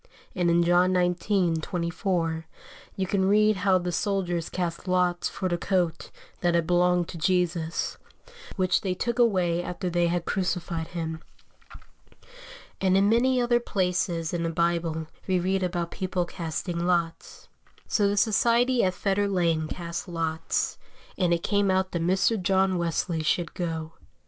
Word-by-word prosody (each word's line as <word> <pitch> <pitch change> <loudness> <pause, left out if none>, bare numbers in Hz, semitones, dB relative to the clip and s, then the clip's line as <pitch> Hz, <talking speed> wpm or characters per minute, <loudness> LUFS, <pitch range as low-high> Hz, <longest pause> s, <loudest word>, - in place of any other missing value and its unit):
And 175 -2 +1
in 170 0 +4
John 175 +2 +3
xix. 180 -1 +1
24, 170 -1 -2 0.5
you 190 - -1
can 190 0 +1
read 215 0 +4
how 190 0 +3
the 180 0 -3
soldiers 175 -3 -1
cast 175 0 -4
lots 180 -1 +1
for 185 - -3
the 175 -1 -1
coat 175 -4 -1 0.3
that 175 -1 +1
had 170 -1 +2
belonged 175 0 +2
to 170 - -7
Jesus, 170 -1 0 0.6
which 185 -2 +1
they 185 -2 -2
took 235 +5 -2
away 180 -7 +2
after 180 0 -4
they 175 0 +2
had 170 0 -1
crucified 175 -3 -2
Him. 160 -2 -5 1.6
And 190 0 +3
in 200 +1 +4
many 250 +3 +3
other 240 0 +3
places 180 -6 -1
in 170 - -1
the 165 - -1
Bible 165 -1 0 0.2
we 185 -1 +2
read 190 +2 0
about 175 -2 -2
people 185 -1 -2
casting 170 0 -4
lots. 170 -2 -2 0.4
So 205 -2 +2
the 200 +1 0
society 235 +3 +3
at 185 -1 +1
Fetter 200 +2 0
Lane 170 -5 +1
cast 170 +2 -5
lots, 165 -2 -2 0.4
and 180 -2 +1
it 170 -1 +1
came 205 -1 +1
out 190 0 +1
that 170 - -2
Mr. 190 +5 +2
John 190 0 +2
Wesley 170 0 -1
should 170 +2 0
go. 165 -2 -4
180 Hz, 155 wpm, -26 LUFS, 170-190 Hz, 1.6 s, in